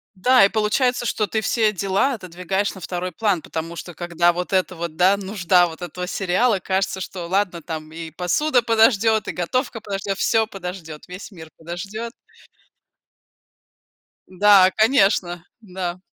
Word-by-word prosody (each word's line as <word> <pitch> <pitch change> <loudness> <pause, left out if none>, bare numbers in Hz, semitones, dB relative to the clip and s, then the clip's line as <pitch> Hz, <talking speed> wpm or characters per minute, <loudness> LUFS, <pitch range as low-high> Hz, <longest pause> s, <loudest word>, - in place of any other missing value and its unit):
Да, 250 +4 +5
и - - +5
получается, 240 +4 0
что 215 -2 0
ты 220 +3 -1
все 220 -1 +1
дела 200 +7 0
отодвигаешь 190 0 -3
на 190 - -11
2 180 +1 -4
план. 205 -2 0
Потому 165 +1 -6
что, 175 0 -8
когда 175 +1 +1
вот 180 +3 -5
это 185 -1 +1
вот, 170 -2 -6
да, 185 +3 +4
нужда 190 -3 +2
вот 160 +1 -11
этого 180 +1 -5
сериала, 195 +5 +1
кажется, 190 +1 -1
что 180 -2 -6
ладно, 180 -2 -1
там 155 -1 -7
и 165 0 -7
посуда 245 - +1
подождет, 225 -1 +3
и - - -2
готовка 230 - -2
подождет, 195 -1 -4
всё 225 -1 +2
подождет, 180 -6 -8
весь 180 +4 -9
мир 160 -5 -12
подождет. 195 +8 -6 2.2
Да, 190 0 +5
конечно, 195 -7 +2 0.2
да. 185 -3 -5
190 Hz, 150 wpm, -21 LUFS, 175-215 Hz, 2.2 s, Да